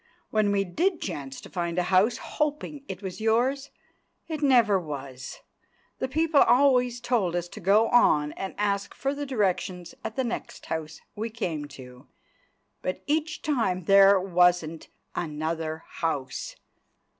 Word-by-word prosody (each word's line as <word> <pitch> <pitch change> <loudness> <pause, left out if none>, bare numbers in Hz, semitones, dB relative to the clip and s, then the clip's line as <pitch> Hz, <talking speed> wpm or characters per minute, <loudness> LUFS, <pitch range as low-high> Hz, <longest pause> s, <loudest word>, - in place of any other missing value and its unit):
When 215 -2 +2
we 200 -1 +2
did 335 - 0
chance 140 -7 -5
to - - -11
find 170 -1 -2
a 180 - +2
house, 200 +6 +4
hoping 300 -1 -3
it 190 +1 -7
was 190 +2 -6
yours, 255 +5 +1 0.6
it 310 -2 -4
never 240 -8 +4
was; 140 -5 -7 0.6
the - - -1
people 315 +2 +3
always 250 -2 +4
told 235 -8 0
us 175 0 -2
to - - -9
go 205 +5 +4
on 150 -11 +4
and 190 +4 -6
ask 200 -1 -1
further 280 +2 -2
directions 185 -7 -1
at 220 - -5
the 265 - 0
next 240 -1 -5
house 160 -1 -5
we 220 +2 -3
came 175 -10 -3
to, 125 -1 -13 0.7
but 185 - -4
each 310 +1 -1
time 225 -11 0
there 195 +2 +7
wasn't 175 -3 +2 0.3
another 160 0 -3
house. 140 -6 -3
195 Hz, 145 wpm, -27 LUFS, 165-250 Hz, 0.7 s, there